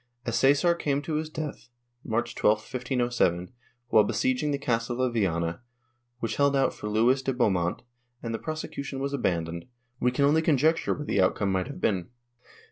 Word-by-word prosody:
As 115 - -1
Csesar 145 +6 +4
came 145 0 0
to 155 - -4
his 155 0 -3
death, 155 -4 -6 0.3
March 120 +1 -1
12, 105 +1 +3
1507, 120 -8 -1 0.4
while 110 - +6
besieging 255 - 0
the 140 - 0
castle 120 -2 -1
of 130 -2 +1
Viana, 85 -6 0 0.6
which 115 -2 -3
held 140 -1 +3
out 135 -1 +2
for 105 - -7
Luis 120 +5 +3
de 135 - -1
Beaumont, 95 -9 0 0.4
and 115 -1 -3
the 115 - -3
prosecution 145 -3 -5
was 140 +1 -2
abandoned, 85 -8 -1 0.4
w^e 125 - +3
can 140 +3 +2
only 155 +3 +4
conjecture 160 +1 +2
what 150 - -6
the 100 - +1
outcome 95 +1 +1
might 95 +3 0
have 145 - -8
been. 90 -4 0
125 Hz, 175 wpm, -27 LUFS, 105-140 Hz, 0.6 s, while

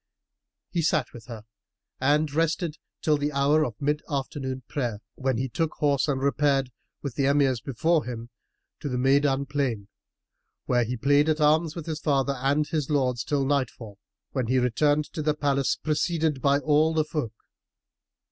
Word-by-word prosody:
He 175 - 0
sat 155 - 0
with 115 -2 -12
her 115 -3 -8 0.6
and 145 +2 +2
rested 165 0 0 0.3
till 150 -1 +3
the 145 +1 -1
hour 145 +2 +3
of 115 -6 -4
mid 150 +1 0
afternoon 135 -2 -3
prayer, 120 -7 -2 0.2
when 130 -2 -1
he 130 +3 -1
took 160 +5 -2
horse 145 -1 +1
and 140 -3 0
repaired, 140 -1 +1 0.3
with 140 -4 -3
the 135 +3 +1
Emirs 140 -4 +2
before 155 +5 +1
him, 120 -1 -6 0.5
to 145 - -4
the 125 - -2
Maydan 135 +1 +2
plain, 130 -8 -2 0.8
where 120 -1 +2
he 125 +3 -3
played 145 +5 +3
at 155 0 +1
arms 155 +1 +3
with 165 -3 -6
his 160 -2 -4
father 140 -3 +1
and 140 +3 +2
his 150 -3 -2
lords, 130 -5 +1
till 140 -2 0
night 135 -3 +1
fall, 105 -4 -12 0.3
when 130 -4 -1
he 130 +2 +2
returned 145 +5 +2
to 155 - -3
the 150 0 +1
palace, 140 -2 +1
preceded 155 -2 0
by 140 +1 +4
all 155 +2 +2
the 155 -1 +2
folk. 145 -8 -4
140 Hz, 175 wpm, -26 LUFS, 130-150 Hz, 0.8 s, by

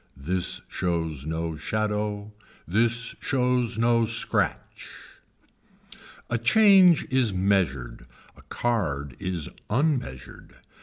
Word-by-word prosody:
This 90 +6 -2
shows 80 -5 -3
no 80 0 -3
shadow. 105 +4 -3 0.3
This 115 +6 +1
shows 125 -3 0
no 115 0 +3
scratch. 115 +1 -1 1.4
A 120 - -1
change 190 - +5
is 130 -6 +2
measured, 70 -12 -1 0.3
a - - -17
card 75 - -2
is 90 -5 -3 0.2
unmeasured. 125 - -2
105 Hz, 90 wpm, -25 LUFS, 80-120 Hz, 1.4 s, change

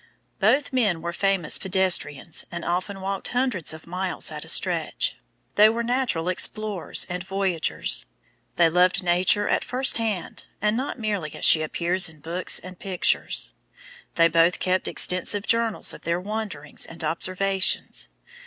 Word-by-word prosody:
Both 260 +8 +2
men 200 -10 +1
were 170 0 -3
famous 195 -3 +1
pedestrians 180 -5 +1
and 175 -1 -6
often 185 +3 -3
walked 195 0 -3
hundreds 245 - 0
of 160 0 -8
miles 180 +2 -3
at - - -7
a - - -13
stretch. - - +1 0.4
They 210 +1 +6
were 230 +1 -2
natural 240 -9 0
explorers 205 +1 0
and 180 0 -5
voyagers. 190 - -1 0.5
They 170 - +4
loved 180 +3 +2
Nature 185 +4 +2
at - - +1
first 260 0 +2
hand, 215 -6 -4
and 210 +1 +1
not 260 +3 -3
merely 205 - -3
as - - -1
she 155 - +7
appears 175 +3 +1
in 155 -1 -15
books 170 +5 +1
and 185 -1 -8
pictures. 185 -3 -1 0.6
They 165 0 +5
both 170 +2 +3
kept 185 0 0
extensive 190 +3 +2
journals 230 -1 0
of - - -11
their 170 +1 -1
wanderings 205 -6 -4
and 165 0 -9
observations. 185 +4 0
185 Hz, 150 wpm, -24 LUFS, 170-210 Hz, 0.6 s, she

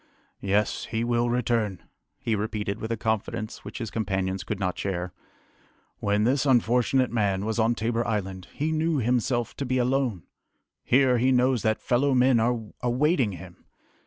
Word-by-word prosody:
"Yes, 100 +2 0
he 115 0 -2
will 120 0 +1
return!" 115 -5 0 0.3
he 115 - -1
repeated 105 -1 -3
with 110 - -4
a 115 - -1
confidence 110 0 -3
which - - -8
his 115 -5 -5
companions 95 -3 -2
could 100 +3 -4
not 90 -3 -1
share. 90 -2 -3 0.9
"When 105 +1 +1
this 130 +4 +2
unfortunate 125 -1 +2
man 100 -4 0
was 110 +1 -1
on 115 +1 +3
Tabor 115 +1 -1
Island, 95 -4 -3
he 155 +2 -2
knew 160 0 +1
himself 120 0 0
to - - -2
be 130 -1 0
alone! 125 - 0 0.6
Here, 130 -1 +3
he 130 +2 +3
knows 125 -1 +3
that 110 -1 +1
fellow 130 +2 +2
men 125 -1 +4
are 120 +1 +1 0.2
awaiting 125 - +1
him! 90 0 -11
115 Hz, 160 wpm, -26 LUFS, 105-125 Hz, 0.9 s, men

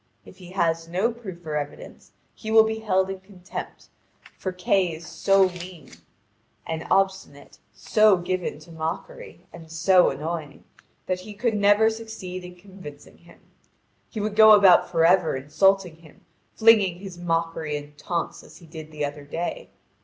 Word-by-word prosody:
If - - -15
he 180 -1 -12
has 165 -3 0
no 190 +8 0
proof 190 -8 -10
or 155 -1 -4
evidence 145 -1 -7 0.2
he 220 - -9
will 220 0 +7
be 220 0 -3
held 190 -3 0
in 190 - -7
contempt, 190 -1 -10 0.5
for 185 - -4
Kay 180 -1 0
is 165 +2 -11
so 190 +3 +2
mean 180 -4 -11 0.7
and 160 -1 -5
obstinate, 190 -7 -1
so 215 -3 +3
given 180 -2 -3
to 170 - -15
mockery, 160 +1 -6
and 165 -1 -12
so 180 +3 +4
annoying, 150 +1 -6 0.4
that 185 -1 -2
he 210 +3 -10
could 235 +2 0
never 205 +1 +4
succeed 220 -5 -8
in 180 0 -11
convincing 180 -6 -13
him. - - -20 0.7
He 220 - -6
would 210 0 -3
go 220 0 +8
about 195 -4 +6
for 165 -2 +2
ever 180 -3 +3
insulting 175 +5 +1
him, 160 -2 -20 0.3
flinging 215 -6 +4
his 185 -2 -10
mockery 165 -3 -2
and 145 0 -11
taunts 170 +3 -4
as - - -16
he 170 - -16
did 155 -1 -10
the 150 -1 -3
other 145 0 -7
day. 175 - -5
180 Hz, 160 wpm, -24 LUFS, 160-195 Hz, 0.7 s, go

